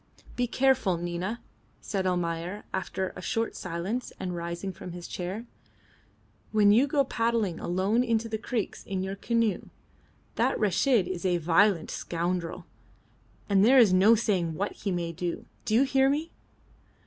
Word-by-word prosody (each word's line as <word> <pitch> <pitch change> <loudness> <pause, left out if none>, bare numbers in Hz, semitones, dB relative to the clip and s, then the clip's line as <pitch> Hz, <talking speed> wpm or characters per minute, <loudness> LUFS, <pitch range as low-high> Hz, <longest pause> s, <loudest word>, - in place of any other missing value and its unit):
"Be 245 0 0
careful, 255 -8 +2
Nina," 175 +7 -3 0.4
said 190 -3 -2
Almayer, 175 +2 -2
after 190 0 -3
a 185 - -7
short 225 +4 -2
silence 185 +8 -4
and 180 -2 -3
rising 170 +3 -4
from 180 -1 -9
his 175 -1 -8
chair, 190 +6 -5 1.1
"when 210 -2 +5
you 245 +7 +5
go 285 0 +2
paddling 230 -8 0
alone 195 +7 +1
into 230 -2 0
the 220 -1 -3
creeks 220 -1 -3
in 190 -1 -3
your 190 +1 -3
canoe. 230 -1 0 0.7
That - - +2
Reshid 215 +2 +3
is 185 -1 -4
a 180 -2 +2
violent 170 +2 +3
scoundrel, 175 0 -3 0.8
and 195 -1 +4
there 255 +5 +6
is 225 -7 +7
no 200 +5 +6
saying 190 -8 0
what 200 +5 -2
he 200 - -4
may 170 -2 -2
do. 170 +1 -4 0.2
Do 215 - +1
you 250 - +6
hear 270 0 +3
me?" 305 +4 -1
195 Hz, 155 wpm, -28 LUFS, 175-230 Hz, 1.1 s, is